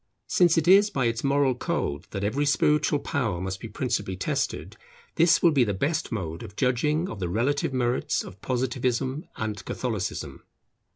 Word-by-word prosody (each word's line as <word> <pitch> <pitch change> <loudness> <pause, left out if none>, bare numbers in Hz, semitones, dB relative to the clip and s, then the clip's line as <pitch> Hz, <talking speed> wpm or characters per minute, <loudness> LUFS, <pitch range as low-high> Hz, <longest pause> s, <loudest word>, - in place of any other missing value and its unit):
Since 175 -2 +3
it 165 0 +1
is 200 +3 +7
by 130 -9 -1
its 115 0 -1
moral 140 -1 +3
code 75 -11 -3
that 100 -1 -4
every 140 +8 0
spiritual 150 0 +3
power 120 -10 -2
must 95 +1 -4
be - - -7
principally 110 -6 -2
tested, - - -2 0.4
this 170 0 +4
will 170 - +6
be 140 -4 +4
the 100 -4 -1
best 155 - -1
mode 85 -6 -4
of 95 - -10
judging 150 - +1
of 110 - -7
the 90 -2 -2
relative 130 +10 0
merits 125 -1 0
of 95 +1 -12
Positivism 130 +2 -1
and 105 -2 -4
Catholicism. 110 -7 -4
125 Hz, 170 wpm, -26 LUFS, 105-145 Hz, 0.4 s, is